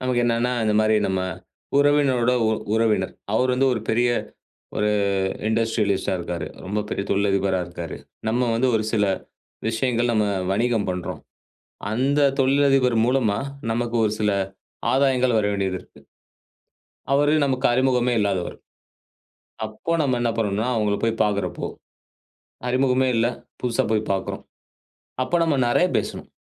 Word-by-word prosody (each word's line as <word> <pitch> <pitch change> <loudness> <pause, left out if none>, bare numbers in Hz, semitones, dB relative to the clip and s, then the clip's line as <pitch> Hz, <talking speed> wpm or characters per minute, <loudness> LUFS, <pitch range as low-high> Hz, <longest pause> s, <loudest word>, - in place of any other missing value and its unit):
நமக்கு 125 -1 0
என்னன்னா, 120 +1 +1
இந்தமாரி 110 0 +3
நம்ம 95 -1 0 0.6
உறவினரோட 140 -4 +3 0.2
உ - - +2 0.2
உறவினர். 110 -4 +1 0.2
அவரு 125 +4 +2
வந்து 135 +1 +2
ஒரு 110 - -3
பெரிய 120 +2 +2 0.7
ஒரு 105 0 +1 0.6
இண்டஸ்ட்ரியலிஸ்ட்டா 110 -4 0
இருக்கிறாரு. 85 -1 -4 0.2
ரொம்ப 105 +3 -1
பெரிய 100 - -2
தொழிலதிபரா 100 -1 +1
இருக்காரு. 85 -1 -7 0.3
நம்ம 120 +1 +1
வந்து 130 +3 +2
ஒரு 110 - +1
சில 105 -2 +3 0.6
விஷயங்கள் 120 +1 0
நம்ம 110 -1 +2 0.3
வணிகம் 115 0 +1
பண்றோம். 90 -1 -4 0.7
அந்த 135 +5 +1 0.2
தொழிலதிபர் 135 -2 +3
மூலமா 120 -5 +1 0.3
நமக்கு 120 0 -1
ஒரு 105 - +1
சில 105 -1 +2 0.6
ஆதாயங்கள் 130 -3 +3
வர 105 - +1
வேண்டியது 95 -2 -1
இருக்கு. - - -19 1.1
அவரு 145 +2 +3
நமக்கு 130 -1 +1
அறிமுகமே 125 -1 +2
இல்லாதவர். 95 -4 -1 1.1
அப்போ 110 +9 -4
நம்ம 130 -4 +1
என்ன 120 - +1
பண்ணனுன்னா, 105 +2 0
அவுங்கள 105 -2 +1
போய் 115 0 -1
பார்க்கிறப்போ, 100 -3 -2 1.0
அறிமுகமே 130 +1 +2
இல்ல 115 +1 +3 0.4
புதுசா 120 -2 +1
போய் 110 0 0
பார்க்குறோம். 95 0 -3 0.8
அப்போ 175 - 0
நம்ம 160 -3 +2
நிறையா 175 +9 +3
பேசணும். - - -4
115 Hz, 125 wpm, -23 LUFS, 105-130 Hz, 1.1 s, இந்தமாரி